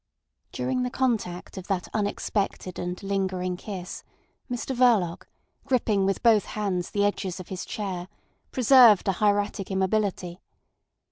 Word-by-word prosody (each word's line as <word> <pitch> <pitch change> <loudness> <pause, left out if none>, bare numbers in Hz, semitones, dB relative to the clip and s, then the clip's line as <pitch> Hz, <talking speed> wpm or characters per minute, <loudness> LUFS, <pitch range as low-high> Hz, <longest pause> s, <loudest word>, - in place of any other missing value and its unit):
During 260 -1 -1
the 250 - -1
contact 220 -10 -2
of 185 - -11
that 190 -3 -1
unexpected 205 -3 -2
and 180 +2 -4
lingering 190 -2 -1
kiss 185 -1 -7 0.5
Mr 250 +2 -3
Verloc, 225 -9 +2 0.4
gripping 215 -6 +2
with 195 - -1
both 225 -3 +5
hands 190 -4 -2
the 205 0 +1
edges 195 -3 -2
of 185 - -9
his 185 -1 -5
chair, 185 -4 -4 0.4
preserved 245 -5 +6
a - - +4
hieratic 205 0 0
immobility. 190 -2 -1
200 Hz, 130 wpm, -26 LUFS, 185-220 Hz, 0.5 s, preserved